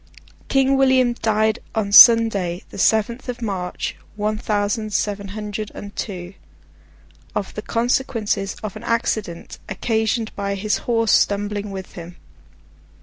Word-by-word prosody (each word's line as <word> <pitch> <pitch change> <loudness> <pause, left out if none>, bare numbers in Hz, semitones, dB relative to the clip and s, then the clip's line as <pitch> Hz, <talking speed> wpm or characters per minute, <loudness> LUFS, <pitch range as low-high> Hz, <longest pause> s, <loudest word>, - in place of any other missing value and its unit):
King 270 0 +2
William 260 -2 +3
died 220 -2 +1 0.2
on 210 -2 -1
Sunday, 205 -6 +7
the - - -8
seventh 230 +5 +1
of 245 - -4
March, 190 -6 -4 0.2
one 210 +1 -1
thousand 210 0 -2
seven 200 -1 -1
hundred 210 +1 -5
and 205 0 -9
two, 180 -3 -6 1.0
of 195 - -3
the 215 - -5
consequences 230 -4 -1
of 210 -3 -5
an 215 - -9
accident 220 -7 -2
occasioned 220 +2 -1
by 200 0 -2
his 210 +1 0
horse 230 -2 +2
stumbling 205 0 +1
with 190 -1 -7
him. 175 0 -9
215 Hz, 130 wpm, -21 LUFS, 200-230 Hz, 1.0 s, Sunday